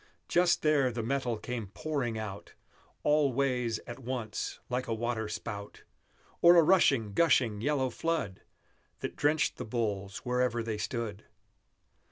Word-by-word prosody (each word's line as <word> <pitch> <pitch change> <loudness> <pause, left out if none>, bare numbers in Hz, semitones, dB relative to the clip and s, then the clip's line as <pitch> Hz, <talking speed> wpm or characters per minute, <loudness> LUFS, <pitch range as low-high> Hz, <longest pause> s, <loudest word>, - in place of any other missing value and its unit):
Just 175 0 +3
there 145 -4 +3
the 115 -1 -3
metal 125 -1 -1
came 115 -1 -5
pouring 120 +1 -3
out, 105 -2 -7 0.5
All 150 -2 +3
ways 125 -3 0
at 120 +2 -8
once, 125 -4 -4
like 125 0 -2
a 115 - -1
water 110 -1 -2
spout, 105 -1 -6 0.6
Or 175 +1 +8
a 170 - +7
rushing, 135 - +4
gushing, 125 -8 +3
yellow 135 -1 +1
flood, 155 - -2 0.6
That - - -4
drenched 150 +1 +1
the - - -4
bulls 105 -4 -2
wherever 125 -1 +1
they 110 -2 -3
stood! 110 -2 -4
120 Hz, 140 wpm, -30 LUFS, 110-140 Hz, 0.6 s, Or